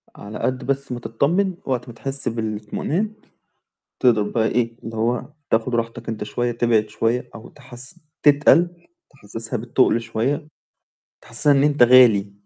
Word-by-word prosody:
على 105 +1 -9
قد 130 0 -2
بس 140 -1 -1
ما 120 - -4
تطمن 175 - 0
وقت 125 -2 -2
ما - - -9
تحس 135 +3 -1
بالاطمئنان 115 - -3 0.9
تقدر 115 -5 +3
بقى 110 +2 0
إيه، 115 -1 -1
اللي 115 0 -7
هو 120 +6 -1 0.2
تأخد 115 +2 +1
راحتك 115 0 -3
أنت 110 -2 -4
شويّة 120 +3 -2
تبعد 115 -2 +1
شويّة 120 +2 -1
أو 115 - -11
تحس 130 +4 -9 0.2
تتقل 150 +4 +5 0.4
تحسسها 115 -2 -4
بالتقل 115 0 +1
شويّة، 125 +7 -2 0.8
تحسسها 145 - +2
إن 140 0 +3
أنت 145 -3 +3
غالي. 115 -5 +6
120 Hz, 145 wpm, -21 LUFS, 115-140 Hz, 0.9 s, غالي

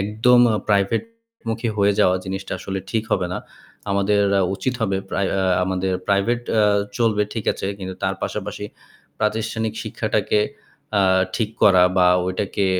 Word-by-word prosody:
একদম 110 +5 +3 0.3
প্রাইভেটমুখী 115 - -2
হয়ে 100 0 +3
যাওয়া 90 -2 +4
জিনিসটা 95 0 -5
আসলে 95 0 -4
ঠিক 110 -1 0
হবে 90 -2 +1
না। - - -2 0.5
আমাদের 100 +1 +2
অ্যা 100 - +3
উচিত 125 +6 -2
হবে 95 -3 +1
প্রাই 100 - 0
অ - - +1
আ - - +1 0.2
আমাদের 95 0 -1 0.2
প্রাইভেট 100 +5 +2 0.2
আ - - +4 0.4
চলবে 110 -3 +2
ঠিক 110 - -3
আছে - - -5
কিন্তু 95 -1 -6
তার - - 0
পাশাপাশি - - -4 0.5
প্রাতিষ্ঠানিক 110 0 -1
শিক্ষাটাকে 105 - 0 0.6
আ - - +4 0.4
ঠিক 110 -3 -1
করা 95 -3 +6
বা 90 -1 +5 0.2
ওইটাকে 95 +1 -1
105 Hz, 150 wpm, -21 LUFS, 95-115 Hz, 0.6 s, করা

